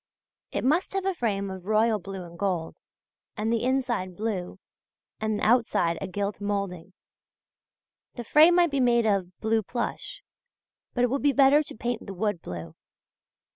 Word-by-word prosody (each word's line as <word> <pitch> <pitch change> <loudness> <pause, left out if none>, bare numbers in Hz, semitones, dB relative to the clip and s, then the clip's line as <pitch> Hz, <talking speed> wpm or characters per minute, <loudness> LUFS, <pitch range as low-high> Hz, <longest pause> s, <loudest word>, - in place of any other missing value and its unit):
It - - -2
must 310 +10 +1
have 390 -1 -1
a 385 - +1
frame 200 - -2
of 190 0 -9
royal 215 0 +3
blue 195 0 -7
and 170 0 -12
gold, 180 -5 -2 0.6
the 225 +2 0
inside 245 -8 -1
blue 205 -5 -3 0.6
and 215 -1 -1
outside 220 -8 +2
a 195 - -3
gilt 200 +2 -3
moulding. 200 -3 -3 1.2
The 240 - -5
frame 310 +8 +6
might 350 -3 +4
be 280 - 0
made 240 -2 +3
of 190 -4 0
blue 220 0 +2
plush; 240 - -5 0.7
but 245 - +2
it 245 - +2
would 275 - 0
be 285 -1 +3
better 275 +2 +6
to 305 - -8
paint 240 0 -3
the 195 - -6
wood 205 -2 -1
blue.... 85 -2 -7
220 Hz, 160 wpm, -26 LUFS, 195-250 Hz, 1.2 s, frame